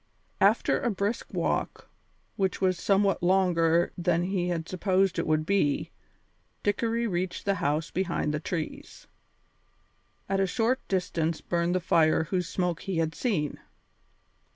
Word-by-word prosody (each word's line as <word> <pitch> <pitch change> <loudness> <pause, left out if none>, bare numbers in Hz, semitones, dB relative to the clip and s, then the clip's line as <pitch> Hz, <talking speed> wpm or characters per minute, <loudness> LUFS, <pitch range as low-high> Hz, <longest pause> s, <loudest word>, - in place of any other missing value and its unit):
After - - +3
a 240 - +1
brisk 205 +2 -2
walk, - - -2 0.5
which 190 -1 -1
was 185 -2 +1
somewhat 195 -1 +2
longer 175 -2 +3
than 175 -1 +1
he 180 -1 -1
had 170 -2 -2
supposed 190 0 +1
it - - -1
would 155 0 +1
be, 165 -7 +1 0.7
Dickory 230 +3 0
reached 180 -3 -2
the 200 - +2
house 150 +3 0
behind 170 -5 -1
the 150 - -1
trees. 160 0 -5 1.2
At 195 0 0
a 195 - +2
short 235 +6 +1
distance 170 -4 -1
burned 170 +1 -1
the - - +2
fire 160 -2 +3
whose 180 +1 -2
smoke 175 -3 -1
he 195 -4 -3
had 160 -1 0
seen. 160 - -1
180 Hz, 140 wpm, -28 LUFS, 165-195 Hz, 1.2 s, After